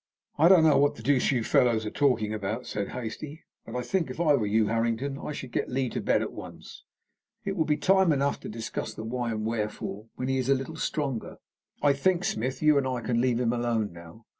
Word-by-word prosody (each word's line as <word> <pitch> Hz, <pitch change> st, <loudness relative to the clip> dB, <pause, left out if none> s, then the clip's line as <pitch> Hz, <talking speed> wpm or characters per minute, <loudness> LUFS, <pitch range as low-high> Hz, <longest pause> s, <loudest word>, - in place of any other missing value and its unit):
"I 160 Hz, -, +7 dB
don't 180 Hz, -3 st, +7 dB
know 155 Hz, -3 st, +5 dB
what 145 Hz, +1 st, +3 dB
the -, -, -11 dB
deuce 140 Hz, -2 st, +3 dB
you 125 Hz, -4 st, 0 dB
fellows 115 Hz, -2 st, +3 dB
are 105 Hz, -, -3 dB
talking 115 Hz, -7 st, +1 dB
about," 110 Hz, +3 st, -3 dB
said 100 Hz, -2 st, -3 dB
Hastie, 140 Hz, +6 st, -6 dB, 0.2 s
"but -, -, -7 dB
I 125 Hz, -, -1 dB
think, 165 Hz, +5 st, -1 dB
if 130 Hz, -, -7 dB
I 160 Hz, -4 st, +4 dB
were 115 Hz, -7 st, +1 dB
you, 110 Hz, +1 st, +3 dB
Harrington, 115 Hz, +5 st, -1 dB
I -, -, -5 dB
should 130 Hz, -4 st, -7 dB
get -, -, -1 dB
Lee 130 Hz, 0 st, -1 dB
to -, -, -3 dB
bed -, -, +2 dB
at -, -, -5 dB
once. -, -, -10 dB, 0.6 s
It 195 Hz, -1 st, -2 dB
will 160 Hz, -4 st, +1 dB
be 150 Hz, -1 st, +1 dB
time 190 Hz, -2 st, +4 dB
enough 140 Hz, -1 st, +1 dB
to -, -, -8 dB
discuss 110 Hz, 0 st, -5 dB
the -, -, -6 dB
why 120 Hz, +1 st, -2 dB
and 110 Hz, -1 st, -3 dB
the -, -, 0 dB
wherefore 105 Hz, -1 st, -4 dB
when 130 Hz, -, -3 dB
he 135 Hz, 0 st, +1 dB
is 130 Hz, +1 st, -2 dB
a 135 Hz, -, +5 dB
little 135 Hz, +5 st, -5 dB
stronger. 140 Hz, -7 st, -3 dB, 0.5 s
I 145 Hz, -1 st, +5 dB
think, 180 Hz, +6 st, +1 dB
Smith, 130 Hz, -, -2 dB
you 150 Hz, -2 st, +5 dB
and 135 Hz, -, -1 dB
I 125 Hz, -2 st, -2 dB
can 120 Hz, 0 st, 0 dB
leave 125 Hz, -2 st, +1 dB
him 120 Hz, -1 st, +1 dB
alone 115 Hz, -5 st, -1 dB
now. 85 Hz, +6 st, -13 dB
125 Hz, 240 wpm, -27 LUFS, 110-145 Hz, 0.6 s, I